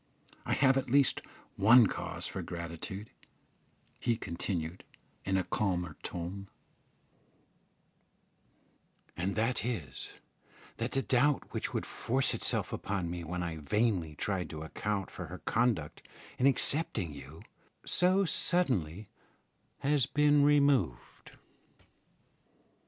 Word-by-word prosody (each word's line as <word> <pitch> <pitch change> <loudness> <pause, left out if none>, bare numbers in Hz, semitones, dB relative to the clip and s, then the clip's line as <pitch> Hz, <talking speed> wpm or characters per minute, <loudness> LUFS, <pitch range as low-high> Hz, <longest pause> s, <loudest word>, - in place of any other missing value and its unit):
I - - +1
have 135 -1 +4
at 130 - -5
least 140 +1 +4 0.4
one 115 +4 +7
cause - - -4
for - - -4
gratitude," 85 +5 -6 0.9
he 120 -2 +1
continued, 85 -2 -4 0.4
in 95 0 +1
a 95 - +1
calmer 90 -4 -1
tone, 90 +3 -5 2.7
"and 95 +3 -2
that 115 +3 0
is, 100 - -4 0.7
that 115 +2 -3
the 135 - +1
doubt 130 +5 +1
which - - -2
would - - -1
force 130 +3 0
itself - - -2
upon 95 -4 -2
me 85 -1 -5
when 90 +2 -3
I 85 -2 -4
vainly 85 0 0
tried 95 +3 -2
to 80 -1 -6
account 100 +4 -3
for 95 - -7
her 90 +3 -7
conduct 110 -12 0 0.4
in 130 - +5
accepting 125 - 0
you 70 +3 -11 0.4
so 185 +2 +4
suddenly 110 - +2 0.7
has 140 -2 +2
been 145 0 +4
removed." 140 - +2
100 Hz, 115 wpm, -31 LUFS, 85-130 Hz, 2.7 s, one